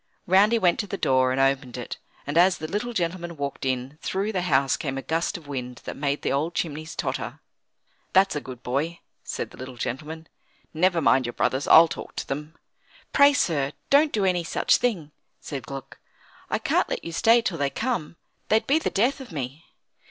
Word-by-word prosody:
Round 195 +4 +5
he 235 - +4
went 180 -6 +2
to 205 - -2
the 200 - -4
door, 130 -4 +3
and 130 - 0
opened 135 -2 +1
it; 120 - -6 0.3
and 145 - -4
as 180 +2 +5
the 155 - -5
little 210 +7 -2
gentleman 175 -4 -3
walked 140 -1 -4
in, 130 +3 -2
through 195 +3 -1
the 185 -4 -1
house 140 -6 +2
came 135 -3 -4
a 135 - -4
gust 165 +2 -1
of 160 -4 -14
wind 125 -3 -5
that - - -6
made 140 0 -2
the - - 0
old 155 +5 -1
chimneys 155 0 -3
totter. 130 0 -3 0.7
"That's 190 -1 +4
a 150 - -2
good 130 -2 -10
boy," 150 +7 -2 0.2
said - - -4
the - - -14
little 130 0 -8
gentleman. 155 +7 -5 0.5
"Never 170 +1 +2
mind 130 -3 +3
your 120 - -4
brothers. 130 +2 0
I'll 165 +1 +9
talk - - -8
to - - -4
them." 150 +3 -5 0.6
"Pray, 285 0 +7
sir, 150 - 0 0.2
don't 290 +2 +5
do 205 -3 +1
any 180 -2 +1
such 165 - +2
thing," 190 -12 -1 0.3
said 140 -4 -7
Gluck. 135 -2 -8 0.5
"I - - +1
can't - - +1
let - - -3
you 170 - -5
stay 230 +7 +4
till 170 -6 -2
they 140 -1 +1
come; 170 - -2 0.3
they'd 220 +1 +3
be 290 +4 +3
the - - -1
death 245 +7 +1
of 260 - -10
me." 140 +1 -5
155 Hz, 205 wpm, -25 LUFS, 135-185 Hz, 0.7 s, I'll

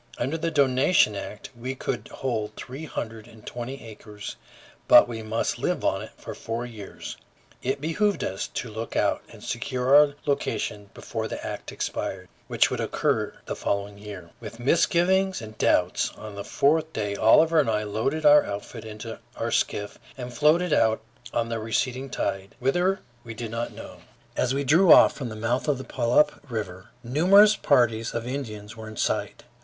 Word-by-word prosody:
Under 135 +6 -1
the 165 +1 -1
donation 135 - +3
act 105 +2 -7
we 125 +3 -5
could 120 -4 -4
hold 110 -5 -3
three 135 +5 -7
hundred 115 -6 -6
and 110 -2 -16
twenty 125 +3 -6
acres, 105 -2 -9 0.5
but - - +8
we 115 -2 -5
must 110 - -2
live - - -1
on - - +1
it - - -8
for - - -8
four 115 +2 -4
years; 110 -5 -8 0.4
it 135 +2 -1
behooved 200 +7 0
us 95 - -3
to 115 - -5
look 110 +2 -6
out - - +2
and - - -13
secure 130 +2 +1
our 145 -1 +6
location 105 -7 -2
before - - -4
the - - -6
act - - -5
expired, 95 -1 -4 0.2
which - - +2
would - - -2
occur - - 0
the - - -4
following 100 0 -2
year. 100 -5 -9
With 115 0 -9
misgivings 180 +7 +2
and 110 -1 -9
doubts, 90 0 +2
on 105 -1 -8
the 100 0 -6
fourth 155 +7 +2
day 105 -2 -2
Oliver 160 +10 +5
and 140 -6 +2
I 105 -1 +1
loaded 115 +9 -2
our 150 0 +8
outfit 105 +3 -6
into 110 +1 -7 0.2
our - - -2
skiff 105 0 -1 0.2
and 125 -1 -6
floated 155 +5 +3
out 110 -1 +3 0.3
on 115 -1 -1
the 115 -1 -2
receding 125 +4 -1
tide, 95 -5 -3
whither, 175 +9 +1 0.2
we 115 -1 -8
did 115 -1 -5
not 115 +1 -3
know. - - -10 0.4
As 125 - +1
we 140 - 0
drew 160 +7 +5
off - - +8
from 130 -5 -5
the 110 - -7
mouth 115 +5 -1
of 145 -3 +2
the 130 - -6
Puyallup 130 +5 +2
River, 95 -5 -5
numerous 190 - +6
parties 115 - +2
of 115 0 -2
Indians 110 -5 -5
were 110 -1 -9
in 110 -1 -9
sight. - - -1
120 Hz, 180 wpm, -26 LUFS, 110-145 Hz, 0.5 s, but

